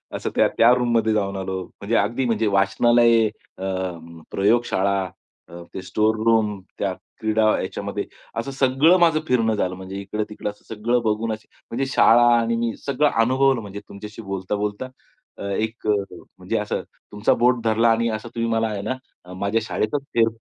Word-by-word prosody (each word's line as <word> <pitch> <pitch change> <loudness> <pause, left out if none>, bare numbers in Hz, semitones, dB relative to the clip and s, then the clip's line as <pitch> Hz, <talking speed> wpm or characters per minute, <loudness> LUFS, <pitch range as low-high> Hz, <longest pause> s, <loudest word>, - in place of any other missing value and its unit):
असं - - -3
त्या 115 +1 +4
रूममध्ये 115 -3 +1
जाऊन 100 -2 -1
आलो. 95 -1 -3
म्हणजे 105 +3 -4
अगदी 125 +2 0
म्हणजे 110 -2 +1
वाचनालय 115 +4 +4 0.3
अ, 95 - -7 0.7
प्रयोगशाळा 100 -2 +2 0.5
अ, 85 0 -9
ते 95 - -5
स्टोर 110 +3 +1
रूम, 110 -3 +2 0.2
त्या 95 -2 0 0.3
क्रीडा 110 0 +1 0.2
याच्यामध्ये - - -4 0.3
असं 135 - -4
सगळं 135 +6 +4
माझं 165 -2 +4
फिरणं 115 -3 +2
झालं. 90 -2 -1
म्हणजे 95 +1 -8
इकडे-तिकडं 105 +1 -4
असं 105 - -12
सगळं 120 +3 +1
बघून 110 +1 0
असे 110 - -9 0.2
म्हणजे 135 +4 -1
शाळा 120 +1 +6
आणि 115 0 +1
मी 115 -1 -1
सगळं 145 +1 +2
अनुभवलं 130 0 +3
म्हणजे 100 0 -7
तुमच्याशी 105 +2 -9
बोलता-बोलता. 100 +4 -3 0.5
अ, - - -7
एक 110 +3 -3
अ, - - +4 0.5
म्हणजे - - -2
असं - - -2 0.3
तुमचं 105 +1 +1
बोट 120 0 +3
धरला 115 +1 +3
आणि 115 +1 +1
असं 110 +1 -4
तुम्ही 115 0 -1
मला 115 0 +1
आहे 105 -2 -4
ना 110 -6 -7
माझ्या 100 +4 0
शाळेतच 125 +6 -2
फेर 115 -1 +4
110 Hz, 160 wpm, -22 LUFS, 100-120 Hz, 0.7 s, शाळा